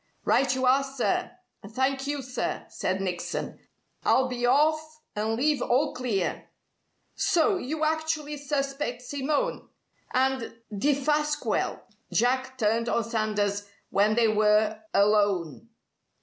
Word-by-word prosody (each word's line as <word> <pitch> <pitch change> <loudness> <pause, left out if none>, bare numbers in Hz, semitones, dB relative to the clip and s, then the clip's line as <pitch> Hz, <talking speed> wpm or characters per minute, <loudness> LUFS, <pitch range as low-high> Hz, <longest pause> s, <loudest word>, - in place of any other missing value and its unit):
"Right 270 -1 +3
you 260 0 0
are, 265 +2 +4
sir, 270 -2 -1 0.3
and 200 - -11
thank 270 +3 0
you, 290 -1 -2
sir!" 255 0 -3
said 190 +1 -2
Nickson. 180 -2 -3 0.4
"I'll 260 0 +3
be 245 -1 -1
off 310 +3 +2 0.2
and 215 +2 0
leave 285 +2 +1
all 270 +5 +1
clear." 230 -8 -2 0.6
"So, 395 0 +2
you 310 +1 -3
actually 315 -1 -1
suspect 275 -3 -2
Simone? 285 +2 -2 0.4
And 260 -2 0 0.2
Defasquelle!" 295 +5 0 0.3
Jack 260 +2 +1
turned 230 0 +1
on 235 - +1
Sanders 210 -3 -1 0.2
when 210 +2 +3
they 235 -1 +4
were 215 0 +3
alone. 205 -2 +2
255 Hz, 120 wpm, -27 LUFS, 215-290 Hz, 0.6 s, are